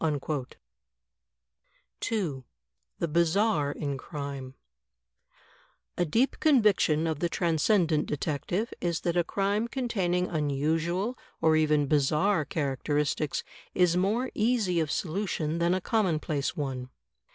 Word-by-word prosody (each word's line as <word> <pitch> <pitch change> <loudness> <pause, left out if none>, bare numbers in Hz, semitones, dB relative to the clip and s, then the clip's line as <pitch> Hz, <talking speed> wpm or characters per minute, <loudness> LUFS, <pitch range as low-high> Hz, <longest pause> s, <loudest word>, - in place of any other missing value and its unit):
2, 170 - -2 0.5
The 170 - -1
Bizarre 170 -1 +2
in 140 -2 -4
Crime 140 -3 -6 1.4
A 175 - +1
deep 230 - +1
conviction 210 - +3
of 160 -3 -1
the 175 - 0
Transcendent 165 -1 +2
Detective 155 - -2
is 170 -2 -1
that 170 -1 -1
a 175 - +3
crime 200 +5 0
containing 195 -9 0
unusual 165 - -1 0.2
or 160 -1 +4
even 155 -2 +3
bizarre 150 +5 +2
characteristics 150 -2 -1 0.3
is 180 -1 +4
more 215 +8 +1
easy 215 -6 +1
of 160 -2 0
solution 170 -3 -2
than 170 +1 +2
a - - 0
commonplace 160 -9 0
one. 130 -3 -3
165 Hz, 105 wpm, -28 LUFS, 150-195 Hz, 1.4 s, or